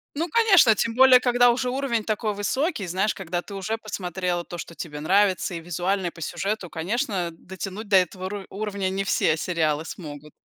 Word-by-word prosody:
Ну, 325 +4 -1
конечно, 385 - +5
тем 230 +3 -1
более 260 0 +7
когда 245 -1 +4
уже 250 +1 0
уровень 250 -4 -1
такой 215 -1 -2
высокий, 240 - -1
знаешь, 190 +5 0
когда 175 -2 -3
ты 200 - -10
уже 215 +4 -3
посмотрела 180 -4 -3
то, 175 0 -8
что 170 - -8
тебе 150 -3 -7
нравится 190 +1 +2
и - - -4
визуально, 175 +3 -1
и - - 0
по 165 - -14
сюжету, 190 +4 -3
конечно, 185 - -2
дотянуть 190 +5 -8
до 200 - +3
этого 185 +1 0
ру 205 -1 -5
уровня 200 -2 -3
не 195 +1 -2
все 155 - +2
сериалы 160 -3 0
смогут. 150 -4 -9
195 Hz, 190 wpm, -24 LUFS, 175-225 Hz, -, более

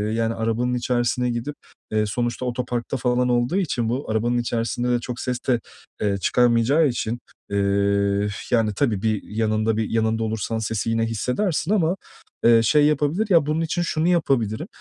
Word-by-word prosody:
yani, 115 0 0
arabanın 115 +2 -1
içerisine 120 0 0
gidip, 120 +5 -3 0.4
eee, 110 0 +1
sonuçta 120 +3 -2
otoparkta 125 0 -2
falan 125 0 +1
olduğu 120 +7 +1
için 125 - 0
bu 125 +2 -3
arabanın 120 +2 +1
içerisinde 120 +1 -1
de 120 -1 +2
çok 120 0 -6
ses 125 -1 -2
de, 125 -3 +3 0.4
eee, 100 -2 +1
çıkarmayacağı 125 - +3
için, 120 -1 -2 0.3
eee, 100 0 +1 0.2
yani, 110 -3 +2
tabii 110 -7 0
bir 110 -2 0
yanında 110 0 0
bir 110 -1 -1
yanında 110 0 0
olursan 110 +1 -2
sesi 110 0 -2
yine 115 0 +1
hissedersin 150 - -1
ama, 180 -4 +2 0.5
eee, 115 -1 +7
şey 150 +6 +4
yapabilir. 150 +8 +1
Ya, 165 -5 +5
bunun 155 +2 0
için 165 +2 -1
şunu 165 -1 0
yapabilirim. 140 - +1
120 Hz, 160 wpm, -23 LUFS, 110-130 Hz, 0.5 s, eee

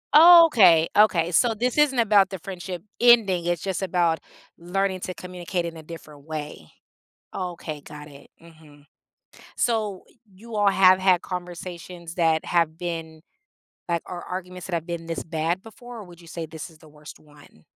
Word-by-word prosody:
Oh, 335 +1 +10
okay, 180 - +5
okay. 180 -5 +3
So, 230 +5 +2
this 245 +4 -2
isn't 295 -3 +3
about 205 -4 +4
the 190 - -6
friendship 180 -1 -7 0.2
ending. 210 -8 +4
It's 175 -2 -1
just 190 -1 -3
about 175 -3 +1 0.4
learning 190 +2 -2
to 185 - -5
communicate 180 0 -5
in 170 - -6
a 160 - -10
different 155 -3 -12
way. 150 - -7 0.6
Oh, 180 -2 -4
okay, 155 -3 -8
got 150 +1 -11
it, 140 -1 -16
mhm. 155 -3 -18 0.7
So, 215 -5 -1 0.3
you 215 +4 -10
all 205 -1 +3
have 185 -1 +5
had 185 -2 +3
conversations 175 -1 -8
that 160 -2 +1
have 165 -2 0
been 165 -2 -6 0.7
like, 170 -1 0
or 175 -1 -7
arguments 180 0 -7
that 180 - -6
have 165 -1 -2
been 170 -1 -5
this 165 - -4
bad 165 +3 -2
before 240 +3 -12
or - - -8
would 175 -1 -15
you 170 - -16
say 165 0 -6
this 160 +2 -9
is 155 - -21
the 155 - -17
worst 150 0 -14
one? 145 - -20
175 Hz, 175 wpm, -24 LUFS, 160-195 Hz, 0.7 s, Oh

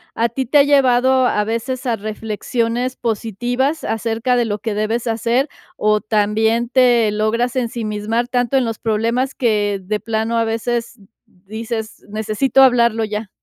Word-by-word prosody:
¿a 230 - +2
ti 260 +2 -3
te 290 - +3
ha 285 - +7
llevado 260 -2 +3
a 210 - +1
veces 230 +4 -3
a 235 -3 0
reflexiones 230 +4 -2
positivas 245 +6 -2
acerca 225 +2 -1
de 240 -1 +2
lo 210 -2 -2
que 220 0 -4
debes 215 +3 -1
hacer, 235 +4 0 0.3
o 215 0 +2
también 220 +2 +1
te 240 -4 +4
logras 230 +4 0
ensimismar 230 -1 -2
tanto 245 +1 +1
en 260 - +2
los 225 -1 -4
problemas 230 +4 0
que 210 -4 0
de 210 +3 -2
plano 225 +1 -1
a 230 - +1
veces 230 +1 -2 0.3
di 195 +4 -12
dices: 225 -1 -5
"Necesito 220 +6 +1
hablarlo 235 -3 +3
ya?". 210 -1 -5
230 Hz, 155 wpm, -19 LUFS, 215-245 Hz, 0.3 s, ha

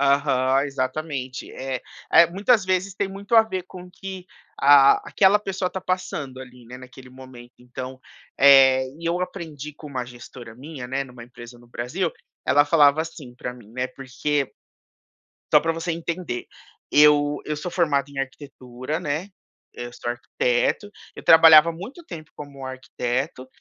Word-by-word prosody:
Aham, 140 -1 +2
exatamente. 135 -1 -4
Eh 130 -1 -4 0.3
eh, 170 - +8
muitas 205 +4 +2
vezes 185 +1 -1
tem 200 0 -2
muito 200 +3 -4
a 225 - +9
ver 190 -5 -4
com 185 0 -11
o 180 - -14
que, 190 0 -9 0.3
ah, 140 0 +7
aquela 195 +1 +4
pessoa 195 -2 -3
tá 190 - -5
passando 155 -8 -4
ali, 125 -1 -13
né, 125 +2 -10
naquele 130 0 -14
momento. 130 -2 -13
Então, 130 +1 -8 0.4
eh, 135 -1 +7
e 170 - -11
eu 175 +2 0
aprendi 160 -6 -6
com 150 - -12
uma 130 -3 -4
gestora 120 -1 -12
minha, 135 0 -9
né, 135 +2 -2
numa 125 -2 -13
empresa 120 0 -13
no 120 - -19
Brasil 150 +10 -3 0.3
ela 145 +3 +4
falava 145 -1 +4
assim 155 -6 -8
pra 125 0 -6
mim, 115 -4 -16
né, 125 +2 -3
porque 135 +1 -3 1.0
só - - +7
pra 165 - 0
você 165 +1 -3
entender, 165 -6 -4 0.4
eu 145 0 +5
eu 150 0 -3
sou 175 +4 -5
formado 150 -6 +1
em 140 - -9
arquitetura, 135 +1 -6
né, 165 +3 -3 0.5
eu 120 0 -7
sou 120 - -7
arquiteto, 120 - -1 0.2
eu - - -10
trabalhava 160 0 +8
há - - -1
muito 205 - -10
tempo 155 - -10
como 140 -2 -10
arquiteto, 130 0 -4
140 Hz, 165 wpm, -23 LUFS, 130-170 Hz, 1.0 s, a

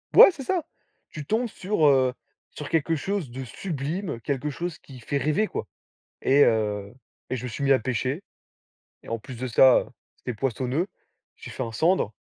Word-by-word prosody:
Ouais, - - +11
c'est 300 -6 -8
ça! 360 +6 0 0.5
Tu 150 -2 -7
tombes 225 - 0
sur, 190 -6 +1
heu, 130 -2 +4 0.4
sur 150 - -7
quelque 165 0 +1
chose 175 -4 -3
de 130 +2 -6
sublime, 155 - -4
quelque 140 +3 -2
chose 170 +2 -4
qui 130 -3 -13
fait 140 +5 -2
rêver, 155 +10 +1
quoi. - - -4 0.6
Et 140 +2 +6
heu, 105 -3 0 0.4
et 130 - 0
je 125 - -6
me - - -3
suis 125 +4 -4
mis 140 - +5
à 130 - +4
pêcher 130 - -2 0.8
et - - -16
en 115 - -2
plus 130 +3 -10
de 130 +2 -4
ça, 125 +2 +7
heu, - - -7 0.3
c'était 125 - -5
poissonneux. 130 - -1 0.5
J'ai - - -10
fait 130 - -4
1 115 - -6
sandre, 160 - +2
140 Hz, 190 wpm, -26 LUFS, 125-165 Hz, 0.8 s, Ouais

